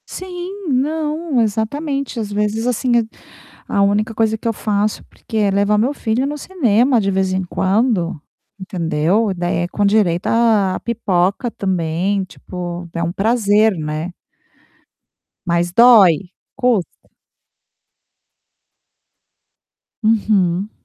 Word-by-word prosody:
Sim, 370 +1 -7
não, 300 +1 0
exatamente. 260 +5 -2
Às 210 -2 -4
vezes, 210 +3 -1
assim, 250 +1 0
eh 235 - +3 0.6
a 200 - 0
única 205 +3 +1
coisa 220 0 +1
que 225 - -5
eu 230 - +1
faço 210 0 -1
porque 220 - -8
é 205 -2 +2
levar 200 +2 +2
o - - +2
meu 245 +7 +1
filho 235 -1 -1
no 295 +1 -3
cinema 255 - +2
de 200 -2 0
vez 190 0 0
em 190 0 -1
quando, 190 - 0 0.4
entendeu? 185 +2 0
Daí 175 -1 -1
é 175 0 -1
com 205 +3 -1
direito 200 -4 +2
a 220 -5 +2
a - - -4
pipoca 200 -1 0
também, 185 +1 -1
tipo, 175 -1 -7
é 170 - -3
um 170 - -1
prazer, 215 +1 +2
né? 155 +2 -4 1.3
Mas, 170 0 0
dói. 195 -7 +6 0.3
Custa. 245 -8 -1 2.9
Uhum. 205 -3 +1
210 Hz, 125 wpm, -18 LUFS, 185-235 Hz, 2.9 s, dói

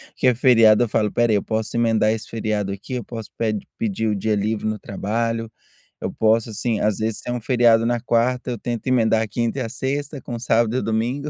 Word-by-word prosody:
que - - +1
é 125 - +5
feriado 115 -3 +5
eu 120 - -2
falo: 105 0 +1
"Espera 120 +1 +1
aí, 100 - +2
posso 110 +1 -3
emendar 115 -2 +2
esse 110 -1 -4
feriado 105 -3 -2
aqui, 100 +6 -7
eu 125 - -2
posso 115 -1 -8
ped 110 -3 -2
pedir 110 0 -1
o 105 - +1
dia 105 +2 0
livre 105 +1 -1
no 110 0 -1
trabalho, 115 +3 -2 0.5
eu - - -3
posso", 110 +1 +2
assim, 110 +1 -1
às 105 -2 +1
vezes, 110 0 -2
tem 120 - -4
um 120 - -3
feriado 115 -2 +4
na 120 0 +1
quarta, 125 +2 0
eu 120 - -3
tento 120 +2 -4
emendar 115 -3 +2
quinta 120 +2 -1
e - - -2
a 115 - -3
sexta, 140 +3 -3
com 120 0 -6
sábado 115 0 +1
e - - 0
domingo, 120 +7 -1
115 Hz, 225 wpm, -22 LUFS, 110-120 Hz, 0.5 s, é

